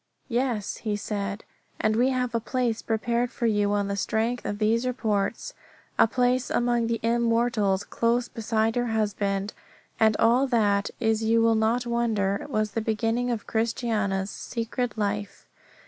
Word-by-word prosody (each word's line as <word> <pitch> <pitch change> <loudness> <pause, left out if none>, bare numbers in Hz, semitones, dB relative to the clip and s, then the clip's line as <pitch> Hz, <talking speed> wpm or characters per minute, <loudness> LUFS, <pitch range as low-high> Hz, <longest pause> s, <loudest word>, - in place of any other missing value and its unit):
Yes, 240 -4 -1
he 215 -2 -2
said, 205 0 -4 0.4
and 215 0 +2
we 245 +3 +3
have 250 -2 -1
a 230 - +1
place 235 -1 -1
prepared 235 +2 0
for 235 - -3
you 205 -2 +2
on 205 -1 0
the 200 - -2
strength 225 +4 -1
of 205 - -2
these 225 +3 +1
reports, 225 - -1 0.5
a - - +7
place 250 +1 +1
among 240 -1 +1
the 230 -1 -1
immortals 230 -4 +1
close 235 +2 0
beside 225 -1 -1
your 245 0 0
husband. 205 -2 -1 0.5
And 220 -1 +4
all 245 +4 +4
that, 205 -5 +2
as 220 -1 +1
you 225 +1 +3
will 230 0 +4
not 225 +3 +1
wonder, 225 -4 0
was 215 -4 0
the 225 - -2
beginning 225 +2 0
of 230 -4 -2
Christiana's 220 -4 -1
secret 235 +1 -4
life. 205 -1 -3
225 Hz, 155 wpm, -26 LUFS, 210-240 Hz, 0.5 s, a